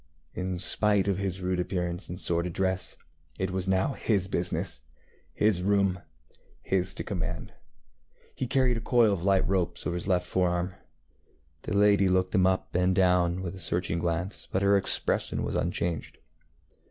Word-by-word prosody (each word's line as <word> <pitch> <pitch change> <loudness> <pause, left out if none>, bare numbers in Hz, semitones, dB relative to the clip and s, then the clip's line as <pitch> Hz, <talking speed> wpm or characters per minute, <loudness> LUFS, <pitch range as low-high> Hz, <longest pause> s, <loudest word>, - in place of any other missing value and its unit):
In 90 0 -3
spite 100 +2 +2
of 100 -1 0
his 95 -1 -3
rude 90 0 -1
appearance 90 0 -2
and 90 +1 -5
sordid 85 -1 0
dress, 95 0 -1 0.4
it 95 -1 -2
was 95 0 -2
now 95 +8 +2
his 100 -7 0
business, 90 -9 -2 0.5
his 105 -4 +1
room, 100 -1 +1 0.6
his 95 -1 0
to - - -4
command. 90 -4 -4 0.8
He 130 - -3
carried 130 -2 +2
a - - -4
coil 115 -2 +4
of 95 - -3
light 95 +1 +2
ropes 95 -2 -1
over 90 - -1
his 90 - -4
left 90 -1 +1
fore 90 0 +1
arm. 90 +1 -2 0.9
The 100 - -2
lady 100 -1 +5
looked 95 0 +1
him 95 -3 +4
up 95 0 -1
and 90 +1 +2
down 90 -1 +2
with 90 - -4
a 95 - -8
searching 85 +1 +1
glance, 85 +3 -2
but 95 - 0
her 100 0 +5
expression 95 -1 0
was - - -3
unchanged. 85 -1 -2
95 Hz, 165 wpm, -28 LUFS, 90-100 Hz, 0.9 s, lady